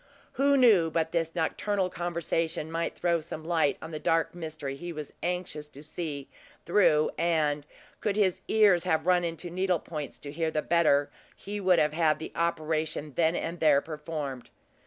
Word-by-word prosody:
Who 280 Hz, +1 st, +3 dB
knew 210 Hz, -10 st, +5 dB
but 160 Hz, 0 st, -1 dB
this 165 Hz, -1 st, -1 dB
nocturnal 185 Hz, +3 st, 0 dB
conversation 165 Hz, -2 st, -2 dB
might 165 Hz, +1 st, -2 dB
throw 170 Hz, -2 st, +1 dB
some 155 Hz, 0 st, -7 dB
light 160 Hz, -3 st, +1 dB
on 160 Hz, -, -7 dB
the 155 Hz, -, -4 dB
dark 165 Hz, +1 st, +1 dB
mystery 155 Hz, -5 st, -5 dB
he 175 Hz, +5 st, -6 dB
was 150 Hz, -3 st, -7 dB
anxious 175 Hz, -4 st, -3 dB
to 145 Hz, 0 st, -12 dB
see 155 Hz, -3 st, -5 dB, 0.4 s
through, 160 Hz, -5 st, +4 dB
and, 150 Hz, -3 st, +1 dB, 0.3 s
could 205 Hz, -2 st, -1 dB
his 195 Hz, -4 st, +2 dB
ears 205 Hz, -6 st, +5 dB
have 160 Hz, -3 st, +1 dB
run 180 Hz, -1 st, +4 dB
into 170 Hz, +1 st, -4 dB
needle 185 Hz, 0 st, +1 dB
points 150 Hz, -2 st, -6 dB
to 145 Hz, -, -7 dB
hear 160 Hz, +2 st, -1 dB
the 155 Hz, -1 st, -1 dB
better, 155 Hz, -4 st, +3 dB, 0.2 s
he 205 Hz, +1 st, -6 dB
would 185 Hz, -2 st, +4 dB
have 150 Hz, -2 st, +2 dB
had 155 Hz, -2 st, +2 dB
the 160 Hz, -, -7 dB
operation 155 Hz, -3 st, -1 dB
then 165 Hz, +3 st, +2 dB
and 170 Hz, 0 st, -3 dB
there 150 Hz, -3 st, +5 dB
performed. 150 Hz, -4 st, -6 dB
165 Hz, 175 wpm, -28 LUFS, 155-175 Hz, 0.4 s, knew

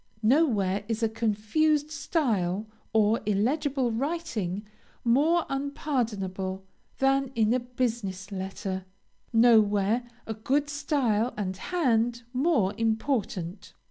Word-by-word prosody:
Nowhere 215 Hz, -, +3 dB
is 225 Hz, 0 st, -2 dB
a 225 Hz, -, +3 dB
confused 235 Hz, +8 st, +1 dB
style, 220 Hz, -, 0 dB, 0.3 s
or 220 Hz, +1 st, +3 dB
illegible 255 Hz, +5 st, +1 dB
writing, 225 Hz, -, -2 dB, 0.4 s
more 300 Hz, +8 st, +3 dB
unpardonable 220 Hz, -10 st, -2 dB, 0.3 s
than 270 Hz, 0 st, +2 dB
in 220 Hz, 0 st, +3 dB
a 255 Hz, -, +2 dB
business 230 Hz, -6 st, -3 dB
letter; 190 Hz, 0 st, -4 dB, 0.5 s
nowhere 220 Hz, -1 st, +4 dB, 0.2 s
a 220 Hz, -, -3 dB
good 280 Hz, +7 st, 0 dB
style 255 Hz, -6 st, 0 dB
and 190 Hz, -3 st, -2 dB
hand 240 Hz, -, 0 dB
more 255 Hz, -, +2 dB
important. 220 Hz, -, -1 dB
225 Hz, 100 wpm, -27 LUFS, 205-275 Hz, 0.5 s, nowhere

